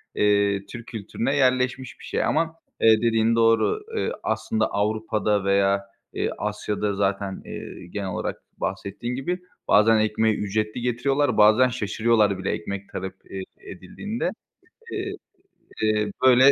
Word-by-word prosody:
eee, 100 -1 +2
Türk 115 +3 -9
kültürüne 115 +5 -2
yerleşmiş 130 -1 +1
bir - - -11
şey - - -1
ama, 165 0 +1 0.3
eee, 110 0 +6
dediğin 115 0 +3
doğru. 115 - +3 0.2
Iıı, - - 0
aslında 225 -1 0
Avrupa'da 105 -1 0
veya, 100 0 +2 0.3
eee, - - -1
Asya'da 105 -1 -2
zaten, 100 -1 -1
ııı, - - -8
genel 95 +2 -5
olarak 90 - -4 0.2
bahsettiğin 120 +5 -4
gibi, 175 +8 -2 0.3
bazen 110 +2 +5
ekmeği 110 0 +2
ücretli 110 +3 -2
getiriyorlar, 135 +4 +1
bazen 110 +4 +6
şaşırıyorlar 110 -3 +2
bile 95 - -2
ekmek 100 +3 -5
talep 95 0 -5 0.2
ed 95 -1 -4 0.2
edildiğinde. 205 - -4 0.6
Eee, 390 0 -3 0.7
eee, 105 -1 +1
böyle 130 +2 +8
110 Hz, 130 wpm, -24 LUFS, 100-125 Hz, 0.7 s, böyle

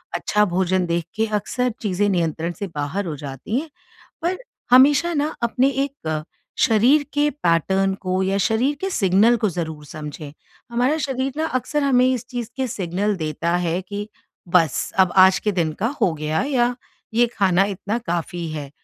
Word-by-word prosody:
अच्छा 210 0 +1
भोजन 185 0 +1
देख 170 -1 -1
के 220 0 +1
अक्सर 250 +4 0
चीज़ें 205 -2 0
नियंत्रण 170 -2 -1
से 200 - -3
बाहर 150 +7 -2
हो 160 -3 -4
जाती 140 - -4
हैं, 320 +1 -7 0.5
पर 355 +3 0 0.3
हमेशा 285 +6 +6
ना 300 0 0
अपने 250 +3 +2 0.2
एक 160 - -4 0.4
शरीर 245 +7 +4
के 290 +1 +2
पैटर्न 190 - +1
को 185 0 -1
या 195 +1 0
शरीर 235 +8 +1
के 385 - -1
सिग्नल 210 - +3
को 215 -2 +1
ज़रूर 160 -3 -5
समझें। 150 0 -8 0.4
हमारा 250 +6 +1
शरीर 265 -1 -2
ना 320 - 0
अक्सर 295 +3 -2
हमें 255 -2 +4
इस 255 -2 0
चीज़ 245 -3 -4
के 265 - 0
सिग्नल 200 0 -1
देता 165 +1 -1
है 175 0 -1
कि 205 +2 -6 0.4
बस! 165 -5 +2
अब 185 -2 +5
आज 190 0 +6
के 210 - 0
दिन 170 -5 0
का 220 - +1
हो 190 -6 +3
गया 155 0 -1
या 245 -3 +1 0.4
ये 240 +2 +4
खाना 190 -2 +4
इतना 200 +3 -3
काफ़ी 170 0 -2
है। 145 -3 -6
195 Hz, 170 wpm, -22 LUFS, 170-250 Hz, 0.5 s, हमेशा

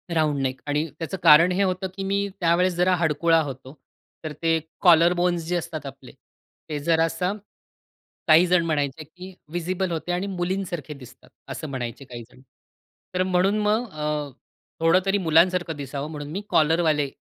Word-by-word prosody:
Round 155 -3 +1
neck 130 -1 -3
आणि 145 +2 0
त्याचं 170 +3 -4
कारण 165 +2 +7
हे 190 +2 +1
होतं 185 0 -1
की 195 - -5
मी 200 +1 -1
त्यावेळेस 175 +1 +2
जरा 180 +1 +2
हडकुळा 165 0 +2
होतो. 135 -2 -7 0.5
तर 155 - -4
ते 165 0 +2 0.2
कॉलर 170 -1 +6
बोन्स 175 -1 0
जे 180 - -1
असतात 155 -3 -6
आपले 135 -1 -10 0.6
ते 150 -1 -3
जरासं 165 +4 0 0.9
काहीजण 170 +2 +5
म्हणायचे 150 -1 -2
की 180 +5 -12 0.2
व्हिजिबल 175 +2 -2
होते 165 +2 -3
आणि 180 +3 -2
मुलींसारखे 175 -5 -3
दिसतात 130 -4 -15 0.2
असं 155 - -6
म्हणायचे 130 0 -6
काही 120 -2 -9
जण. - - -19 0.7
तर 185 0 +1
म्हणून 185 +2 +1
मग 215 +3 0
अ, 150 -2 -3 0.5
थोडं 165 +3 +4
तरी 195 +1 +2
मुलांसारखं 175 -1 +2
दिसावं 140 +1 -6
म्हणून 145 -2 -7
मी 190 +5 -4
कॉलरवाले 155 -2 +2
165 Hz, 155 wpm, -24 LUFS, 150-180 Hz, 0.9 s, कारण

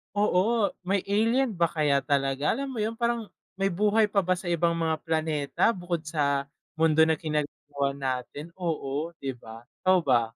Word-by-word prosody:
Oo, 205 +2 +2 0.2
may 195 0 +1
alien 225 +1 +2
ba 170 - +4
kaya 150 -4 +1
talaga? 140 0 +1
Alam 275 +3 -3
mo 255 - -6
'yon, 220 +1 -1
parang 235 -1 -1 0.3
may 195 - 0
buhay 210 +3 +3
pa 200 -1 +1
ba 185 0 0
sa 185 - -9
ibang 170 -1 +1
mga 160 -1 -1
planeta 155 -3 -1
bukod 175 -3 -4
sa 140 -3 0 0.3
mundo 160 -1 +4
na 160 -1 +4
ginagalawan 145 -2 -3
natin? 135 +4 -4
Oo, 160 -3 -3
'di 135 -1 -4
ba? 115 +1 -11 0.2
Ikaw 185 0 +4
ba? 120 -4 +3
165 Hz, 170 wpm, -27 LUFS, 145-200 Hz, 0.3 s, ba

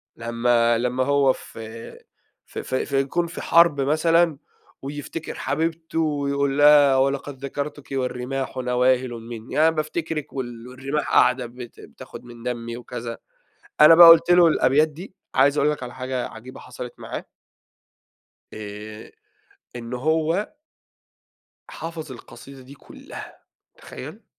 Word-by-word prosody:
لمّا 115 0 +1
لمّا 125 +2 0
هو 140 -1 +3
في 115 -1 -10 0.5
في - - -7
في 130 - -2
في 135 -1 0
يكون 170 +6 -1
في 170 - -8
حرب 170 -4 +4
مثلًا 160 +2 +2 0.4
ويفتكر 145 +3 -6
حبيبته 160 +2 -2
ويقول 140 -2 0
لها: 145 -2 +6
"ولقد 135 0 -1
ذكرتك 145 +1 -6
والرماح 130 0 -3
نواهلٌ 125 0 +1
مني"، 115 0 -9
يعني 160 +2 +3
بافتكرك 155 0 -4
وال 120 -3 -6
والرماح 135 +4 -4
قاعدة 125 -1 +3
بت 120 0 -11
بتاخد - - -12
من 120 -1 -13
دمي 120 -1 -4
وكذا. 120 -1 -7 0.6
أنا 160 +2 +9
بقى 170 0 +10
قُلت 165 +1 +7
له 175 -1 +7
الأبيات 150 0 +3
دي، 170 +6 -11 0.2
عايز 140 +2 +4
أقول 150 +1 +3
لك 150 - -5
على 125 0 -7
حاجة 130 -1 -4
عجيبة 115 +3 -12
حصلت 125 -1 -9
معاه - - -7 1.3
آآ 105 +1 -9 0.7
إن 120 0 -7
هو 160 +8 0 1.2
حَفَظ 160 -4 -7
القصيدة 130 +3 -13
دي 135 +2 -14
كلّها، - - -12 0.4
تخيل؟ - - -10
135 Hz, 130 wpm, -23 LUFS, 125-150 Hz, 1.3 s, بقى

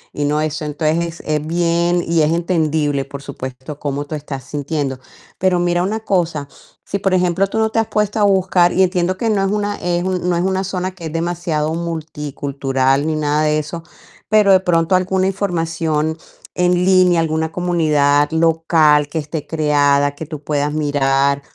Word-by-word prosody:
y 145 - -1
no 150 +1 +1
eso 155 0 -3
entonces 160 +3 -1
es 150 -1 0
bien 170 +1 +1
y 165 -1 +2
es 155 +1 +2
entendible, 155 -5 0
por 140 0 -9
supuesto, 130 +1 -8
cómo 145 0 -3
tú 155 - -8
estás 140 -3 -6
sintiendo, 145 -2 -3 0.4
pero 185 -1 +2
mira 175 0 +1
una 215 +4 -2
cosa, 170 -8 -1 0.4
si 200 - -3
por 195 -1 0
ejemplo 180 +1 +1
tú 210 - -4
no 220 0 +2
te 225 - +1
has 225 - 0
puesto 210 0 -1
a - - +3
buscar 185 -3 +3
y 190 - +4
entiendo 180 0 0
que 230 +1 -1
no 195 -2 +1
es 195 - 0
una 205 -1 -1
es 175 0 -1
un 185 -1 -2
no 175 - +1
es 175 - 0
una 190 0 0
zona 185 0 -3
que 180 -3 -11
es 155 - -5
demasiado 165 -2 -1
multicultural 145 -4 -2
ni 155 - 0
nada 150 0 0
de 150 0 +2
eso, 165 +3 -6 0.5
pero 210 -2 +5
de 190 - +7
pronto 175 0 +2
alguna 185 +1 +1
información 165 -5 -1 0.4
en 180 0 +2
línea, 185 -2 +4
alguna 160 0 -1
comunidad 150 -5 +2
local 160 -2 +3
que 155 - -5
esté 150 0 -4
creada 145 -2 +2
que 150 +1 -8
tú 155 -3 -8
puedas 145 0 -1
mirar 140 -2 +1
165 Hz, 185 wpm, -18 LUFS, 150-180 Hz, 0.5 s, de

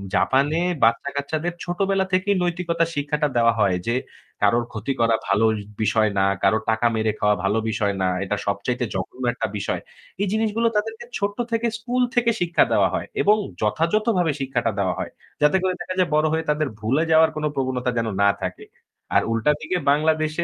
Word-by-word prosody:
জাপানে 140 +5 +2 0.2
বাচ্চা-কাচ্চাদের 140 +8 0
ছোটবেলা 190 +2 0
থেকেই 195 +2 +2
নৈতিকতার 170 -1 0
শিক্ষাটা 150 +1 0
দেওয়া 115 0 +4
হয় 95 -4 +3
যে 115 - +1 0.5
কারো 105 +3 +4
ক্ষতি 110 +5 -3
করা 115 -1 +4
ভালো 100 +4 +3 0.4
বিষয় 110 0 +2
না, - - +3 0.2
কারো 100 +3 +4
টাকা 110 +2 +2
মেরে 110 0 +1
খাওয়া 105 0 +3
ভালো 100 +3 +1
বিষয় 105 -2 0
না। 95 - +2 0.2
এটা 100 +1 -1
সবচাইতে 100 +5 -1
জঘন্য 95 +7 -5
একটা - - -2
বিষয়। 100 - -2 0.4
এই 205 - +1
জিনিসগুলো 220 +1 +1
তাদেরকে 225 +2 -2
ছোট্ট 200 0 -2
থেকে 230 +1 +1
স্কুল 245 +3 -1
থেকে 235 -1 +3
শিক্ষা 170 -1 +3
দেওয়া - - +3
হয় - - -2
এবং 210 +1 +5 0.3
যথাযথভাবে 170 - +1
শিক্ষাটা 125 -4 -1
দেওয়া 95 -2 +1
হয়। - - -4 0.3
যাতে 150 +5 +4
করে 185 -1 +1
দেখা 185 - -4
যায় 180 -2 +2
বড় 155 +1 +3
হয়ে 160 0 0
তাদের 150 0 +1
ভুলে 125 +9 +1
যাওয়ার 160 0 +6
কোন 155 - -4
প্রবণতা 130 -2 -1
যেন 115 -1 0
না 100 - +5
থাকে। - - -5 0.5
আর - - +6
উল্টা 115 +5 +2
দিকে 160 +4 -2
বাংলাদেশে 155 +2 +1
150 Hz, 175 wpm, -23 LUFS, 115-180 Hz, 0.5 s, যাওয়ার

